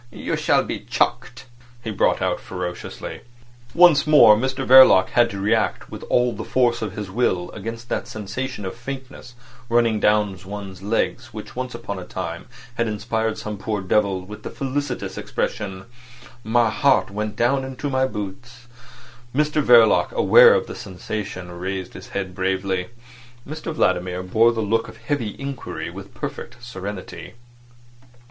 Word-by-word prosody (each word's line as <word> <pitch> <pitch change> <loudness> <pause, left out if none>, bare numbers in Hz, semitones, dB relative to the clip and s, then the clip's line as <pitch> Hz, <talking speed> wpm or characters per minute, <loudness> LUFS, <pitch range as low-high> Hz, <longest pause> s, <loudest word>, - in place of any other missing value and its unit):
"You - - -3
shall - - +2
be - - -4
chucked," 125 +2 -2 0.4
he 110 - -3
brought 100 - +1
out - - 0
ferociously. 90 -1 -6 0.5
Once 170 -4 +6
more 150 -8 +8
Mr 130 +4 -2
Verloc 130 -8 +8
had 120 -1 +3
to 100 - -6
react 110 +3 0
with - - -7
all 125 -1 +2
the - - -6
force 120 -2 +1
of 110 - -3
his 105 -3 -6
will 95 -6 0
against 115 +3 -7
that - - -2
sensation 110 +2 -5
of 95 - -4
faintness 125 -1 -8 0.3
running 115 -2 +2
down 105 -2 +2
one's 95 -1 -8
legs 115 +3 -2
which 105 - -8
once 125 -1 -4
upon 100 -5 -5
a - - -7
time 85 -1 -6 0.3
had 115 -1 +1
inspired 110 +1 -2
some 105 -2 -6
poor 105 +1 -2
devil 95 0 0
with 105 +2 -10
the - - -6
felicitous 135 -1 -3
expression: 95 -2 -4 0.6
"My 115 0 +2
heart 135 -2 +2
went 105 +1 -3
down 130 +3 +1
into 130 +2 -5
my 130 -1 +1
boots." 120 +3 -8 0.7
Mr 150 +1 +2
Verloc, 120 -4 +5
aware 485 0 +7
of 475 -1 0
the - - -8
sensation, 95 -1 -6
raised 90 +1 -5
his 95 - -10
head 95 -2 -4
bravely. 95 -1 -1 0.6
Mr 155 +3 -5
Vladimir 90 - 0
bore 110 +5 +4
the 115 -1 -2
look 115 +2 0
of - - -12
heavy 125 -8 -3
inquiry 140 -2 -6
with - - -11
perfect - - -6
serenity. 100 -3 -7
110 Hz, 155 wpm, -22 LUFS, 95-125 Hz, 0.7 s, more